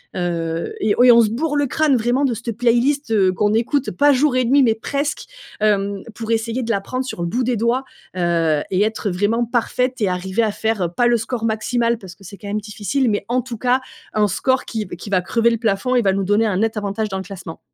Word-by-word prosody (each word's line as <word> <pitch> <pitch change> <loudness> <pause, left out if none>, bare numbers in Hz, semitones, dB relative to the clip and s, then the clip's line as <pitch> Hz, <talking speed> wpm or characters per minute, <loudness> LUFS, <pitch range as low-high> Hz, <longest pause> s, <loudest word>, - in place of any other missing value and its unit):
Heu 165 -2 -2
et 210 -1 +1
ouais, 245 +1 +6
on 235 0 +7
se 220 - +2
bourre 295 +6 -1
le 290 - +2
crâne, 295 +1 +2
vraiment, 245 +5 +1
de 250 -4 0
cette 230 +2 -4
playlist, 245 +4 +2
heu, 190 -4 +3
qu'on 205 +2 +1
écoute, 255 +4 0
pas 290 0 +4
jour 275 0 +2
et 255 -1 +2
nuit 275 +4 +4
mais 230 -4 +3
presque, 280 +6 -3 0.4
hem, 200 -2 0
pour 225 0 -7
essayer 230 +2 -1
de 235 - -5
l'apprendre 225 +5 -2
sur 255 - -6
le - - -1
bout 245 +9 -1
des 245 0 0
doigts, 235 +4 0 0.3
heu 165 -4 +1
et 190 +1 +1
être 220 -1 -1
vraiment 205 +6 0
parfaites 250 +2 -1
et 200 - +2
arriver 190 +4 -1
à 215 - +1
faire, 205 -5 -1
pas 240 +5 +2
le 240 0 +3
score 225 +1 -3
maximal 230 +2 0
parce 190 -5 -11
que 195 - -20
c'est 195 +2 -10
quand 205 - -10
même 210 +1 -2
difficile, 220 +5 -1
mais 205 - -1
en 250 +2 +1
tout 245 -2 -7
cas 250 +3 +1 0.3
un 210 -1 +3
score 260 +7 0
qui 220 -2 -4
v 175 - -8
qui 195 - -9
va 185 -2 +2
crever 230 +5 +2
le 230 - 0
plafond 225 +3 0
et 245 - +3
va 195 -1 +3
nous 195 0 -1
donner 205 +4 +2
un 205 -4 0
net 225 +2 0
avantage 210 +1 -2
dans 190 - -3
le 190 - -4
classement. 185 -4 -9
225 Hz, 245 wpm, -20 LUFS, 195-245 Hz, 0.4 s, on